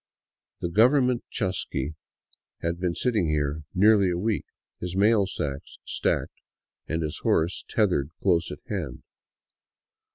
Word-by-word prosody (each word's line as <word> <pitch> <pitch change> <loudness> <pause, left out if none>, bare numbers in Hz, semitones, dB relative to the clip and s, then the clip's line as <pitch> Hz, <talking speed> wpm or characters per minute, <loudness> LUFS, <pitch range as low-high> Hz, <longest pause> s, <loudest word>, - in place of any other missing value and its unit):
The 85 - -1
government 125 +5 +4
chasqui 90 - -2 0.7
had 85 +1 -1
been 90 -2 -1
sitting 110 -4 +1
here 75 0 -1
nearly 100 0 +5
a 85 - 0
week, 105 +3 -1 0.3
his 90 0 -4
mail 100 0 +4
sacks 70 -7 -5
stacked - - -1 0.5
and 80 +1 -1
his 75 - -3
horse 85 +3 +1
tethered 90 -10 +2
close 90 -4 +2
at - - -8
hand. - - -4
90 Hz, 125 wpm, -26 LUFS, 80-105 Hz, 0.7 s, nearly